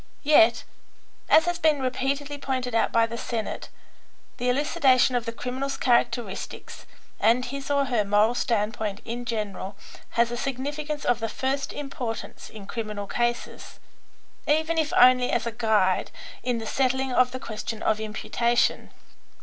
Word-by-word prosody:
Yet, 235 -6 +5 0.7
as 320 - +6
has 350 -1 -1
been 310 -2 +3
repeatedly 275 +2 -2
pointed 255 -3 -2
out 230 - +2
by 230 0 +4
the 230 0 -6
Senate, 225 -3 -4 0.7
the 245 +1 0
elucidation 260 -1 +3
of 240 -1 -1
the - - -1
criminal's 260 +4 -4
characteristics 240 -4 -1 0.3
and 240 +3 +3
his 275 +2 -6
or 280 -1 +2
her 240 -5 +1
moral 205 +3 +3
standpoint 215 -3 -1
in 240 +1 -5
general 205 -3 -4 0.4
has 235 0 +3
a 240 - -3
significance 290 +4 -3
of 245 -1 +2
the 225 0 -2
first 270 +4 -2
importance 255 -5 -6
in 210 -3 -10
criminal 210 -2 -5
cases, 240 +3 -3 0.7
even 315 +2 +2
if 310 -1 0
only 250 0 +6
as - - 0
a 235 - -2
guide 215 -5 +1 0.3
in 245 -1 -1
the 225 - -5
settling 265 +2 0
of 255 0 +4
the 255 - -5
question 220 -1 -5
of 215 - +1
imputation. 235 +2 0
245 Hz, 150 wpm, -25 LUFS, 225-270 Hz, 0.7 s, as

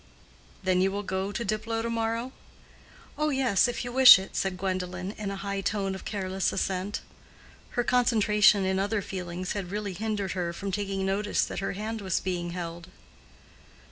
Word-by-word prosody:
"Then 185 -1 +2
you 190 +1 +2
will 200 +1 -3
go 190 +1 -2
to 235 +3 -3
Diplow 220 +2 -2
to 230 - -2
morrow?" 230 +2 -1 0.9
"Oh, 305 0 +2
yes, 255 -9 +3
if 245 0 -3
you 245 - -4
wish 260 +1 +10
it," 190 0 -8
said 190 -1 -1
Gwendolen, 185 0 -3
in 210 -1 -5
a 200 - -3
high 200 0 -3
tone 195 -1 -1
of 190 - -8
careless 190 -2 -1
assent. 190 +2 -2 0.8
Her 240 - +3
concentration 215 -5 +4
in 190 0 +1
other 205 +1 0
feelings 180 -1 -5
had 195 -4 -3
really 205 0 -3
hindered 205 -1 -2
her 175 -2 -2
from 195 +3 -4
taking 195 -1 -2
notice 205 +2 +1
that - - -5
her 195 - -2
hand 215 +2 -4
was 190 -3 0
being 175 -2 -3
held. 170 -1 -6
195 Hz, 175 wpm, -28 LUFS, 185-215 Hz, 0.9 s, wish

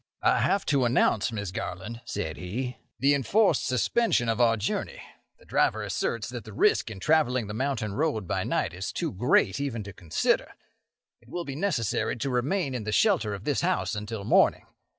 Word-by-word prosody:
"I - - +4
have 200 - +1
to 140 -3 +2
announce, 120 -2 +2
Miss 100 -4 -4
Garland," 100 +6 -5
said 80 -7 -4
he, 125 +8 -4 0.2
"the 140 +2 +3
enforced 155 - +2
suspension 125 - +1
of 115 +2 +1
our 115 -1 +4
journey. 105 - -3 0.4
The - - -21
driver - - +1
asserts 115 -3 -2
that 120 -3 -6
the 110 - -11
risk 105 - +2
in 105 -4 -8
travelling 130 -3 +2
the 105 - -6
mountain 115 -4 -2
road 135 - -1
by - - -1
night - - -1
is 95 +3 -4
too 165 -3 -2
great 125 - +2
even 130 -6 -3
to 100 0 -9
consider. 80 -2 0 0.7
It 120 - -21
will 175 +4 -4
be 140 - -5
necessary 150 - 0
to 130 +3 -3
remain 135 +5 0
in 125 -3 -3
the 110 - -3
shelter 150 - +2
of 100 - -9
this 145 +3 0
house 180 -7 0
until 105 0 -5
morning. - - +3
120 Hz, 190 wpm, -27 LUFS, 105-140 Hz, 0.7 s, I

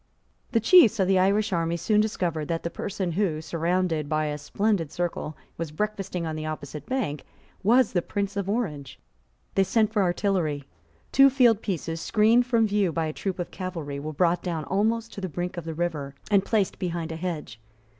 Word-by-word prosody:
The 230 - +3
chiefs 230 - +6
of 190 - +3
the 190 -1 +4
Irish 200 +2 +2
army 170 0 0
soon 210 +5 +2
discovered 175 -8 -1
that 165 -1 -2
the 170 - -3
person 190 -2 -3
who, 170 -3 0
surrounded 165 -1 -1
by 155 0 +1
a 150 0 -2
splendid 190 0 0
circle, 170 -3 -3 0.2
was 165 -2 -2
breakfasting 195 0 -3
on 160 -1 -3
the 155 0 -4
opposite 150 -2 -6
bank, 240 - -2 0.4
was 240 +3 +4
the 175 - +2
Prince 200 +2 -3
of 200 -1 -2
Orange. 150 - -3 0.6
They 195 - +4
sent 215 +2 +1
for 210 - +2
artillery. 175 -5 0 0.5
Two 275 0 +7
field 245 -5 +4
pieces, 165 -5 -3
screened 225 +6 +3
from 230 -2 +3
view 205 -4 +1
by 165 0 -1
a 155 - -3
troop 190 +2 -3
of 175 - -4
cavalry, 165 -7 -5
were 155 +2 -5
brought 170 +3 +2
down 165 -4 -3
almost 220 +7 0
to 200 - -7
the 185 - -3
brink 180 +3 -4
of 175 -2 -6
the 165 -1 -4
river, 155 -5 -3 0.2
and 200 -2 +5
placed 205 -2 0
behind 170 -2 -3
a - - -4
hedge. 160 -8 -5
180 Hz, 195 wpm, -26 LUFS, 160-210 Hz, 0.6 s, Two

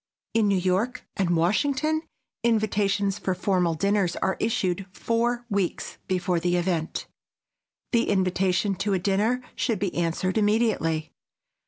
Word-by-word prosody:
In 225 -2 +3
New 200 -1 +3
York 190 +7 0
and 175 -3 +1
Washington, 285 - +1 0.4
invitations 205 -3 +1
for 185 - -1
formal 180 -3 +1
dinners 195 0 +1
are 190 - 0
issued 195 -4 0
four 235 +4 -1
weeks 200 -5 -2
before 180 -1 0
the 175 +1 +1
event. 175 -2 -1 0.9
The 235 -1 +2
invitation 190 +1 +1
to 200 +1 0
a - - +3
dinner 210 +7 +1
should 230 -4 0
be 190 -1 -2
answered 175 +4 0
immediately. 205 -8 +1
195 Hz, 130 wpm, -26 LUFS, 180-220 Hz, 0.9 s, In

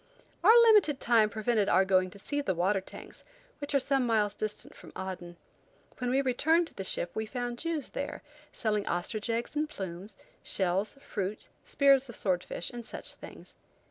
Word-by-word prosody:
Our 445 +6 +8
limited 415 - +5
time 225 -3 +4
prevented 215 -1 0
our 190 - +4
going 185 -1 +3
to 200 - -13
see 290 +8 -2
the 190 -10 -1
water 190 +3 +1
tanks, - - -10 0.4
which 285 0 -3
are - - +6
some 270 0 +1
miles 210 -3 +2
distant 215 0 -4
from - - -13
Aden. 180 -2 -6 0.6
When 250 -1 -1
we 270 +2 +2
returned 320 +7 +3
to - - -22
the 195 - -5
ship 175 -2 0
we 220 0 -3
found 245 0 -4
Jews 330 -4 -3
there, 280 - -5 0.3
selling 210 -3 -1
ostrich 210 +6 -2
eggs 230 +5 -2
and 300 +1 0
plumes, 190 - -7 0.2
shells, 190 +2 0
fruit, 210 -7 -5 0.2
spears 275 -2 +4
of 235 - -8
sword 185 -3 0
fish, 170 - -4
and 240 -1 -7
such - - -6
things. - - -12
220 Hz, 180 wpm, -30 LUFS, 195-275 Hz, 0.6 s, Our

